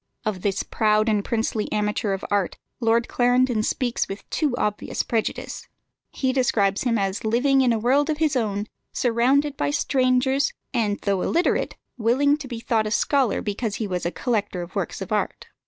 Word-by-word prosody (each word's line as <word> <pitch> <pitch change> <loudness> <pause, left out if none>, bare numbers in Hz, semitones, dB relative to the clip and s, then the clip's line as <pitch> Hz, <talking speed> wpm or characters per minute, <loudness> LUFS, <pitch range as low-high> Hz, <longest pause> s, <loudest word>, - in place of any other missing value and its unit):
Of 205 -4 -2
this 195 0 0
proud 215 0 +2
and 210 -2 +1
princely 220 -1 -1
amateur 210 0 0
of 195 - -4
art 200 -3 0 0.2
Lord 230 0 +2
Clarendon 245 -2 +2
speaks 245 +2 -1
with 195 +1 -8
too 295 -6 0
obvious 210 -3 -1
prejudice. 225 -2 -3 0.4
He 260 -1 -1
describes 205 -7 +2
him 230 -2 +2
as 195 0 -1
living 255 +5 +3
in 250 -2 +3
a 230 - +2
world 270 +7 +2
of 305 - 0
his 310 -3 +1
own, 210 -4 0 0.3
surrounded 260 +5 +2
by - - -1
strangers, 265 -1 +2 0.2
and 215 -4 +1
though 195 -2 0
illiterate, 345 - +1 0.2
willing 265 +6 +3
to 280 -3 -8
be 240 -3 -5
thought 225 -2 0
a - - -1
scholar 260 +1 +1
because 210 +1 -2
he 220 - -2
was 180 -3 -3
a 170 - 0
collector 205 -7 -1
of 175 - -12
works - - -3
of - - -11
art. - - -2
230 Hz, 180 wpm, -24 LUFS, 210-260 Hz, 0.4 s, living